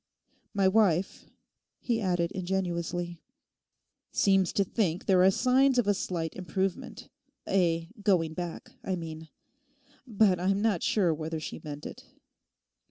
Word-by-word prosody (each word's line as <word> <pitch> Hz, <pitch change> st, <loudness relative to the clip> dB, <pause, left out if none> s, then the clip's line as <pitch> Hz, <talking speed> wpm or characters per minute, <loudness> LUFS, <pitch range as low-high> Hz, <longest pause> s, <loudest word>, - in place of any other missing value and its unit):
My 195 Hz, -1 st, +3 dB
wife,' 190 Hz, -3 st, +2 dB, 0.5 s
he 230 Hz, -2 st, -1 dB
added 175 Hz, -3 st, 0 dB
ingenuously, 175 Hz, -2 st, -3 dB, 0.9 s
'seems 195 Hz, -3 st, +3 dB
to 200 Hz, -, +2 dB
think 185 Hz, -4 st, -1 dB
there 185 Hz, -2 st, +4 dB
are 190 Hz, -, +7 dB
signs 255 Hz, +5 st, +3 dB
of 245 Hz, -, +3 dB
a 205 Hz, -, +3 dB
slight 170 Hz, -4 st, -3 dB
improvement—a 180 Hz, -1 st, -3 dB
going 175 Hz, -6 st, +2 dB
back, 175 Hz, 0 st, -6 dB
I 190 Hz, -, -1 dB
mean. 160 Hz, -2 st, -7 dB, 0.8 s
But 205 Hz, -5 st, +3 dB
I'm 195 Hz, +2 st, +1 dB
not 210 Hz, -5 st, +1 dB
sure 185 Hz, -6 st, +2 dB
whether 160 Hz, +1 st, -4 dB
she 155 Hz, -, -7 dB
meant 145 Hz, -1 st, -7 dB
it. -, -, -8 dB
185 Hz, 125 wpm, -29 LUFS, 170-195 Hz, 0.9 s, are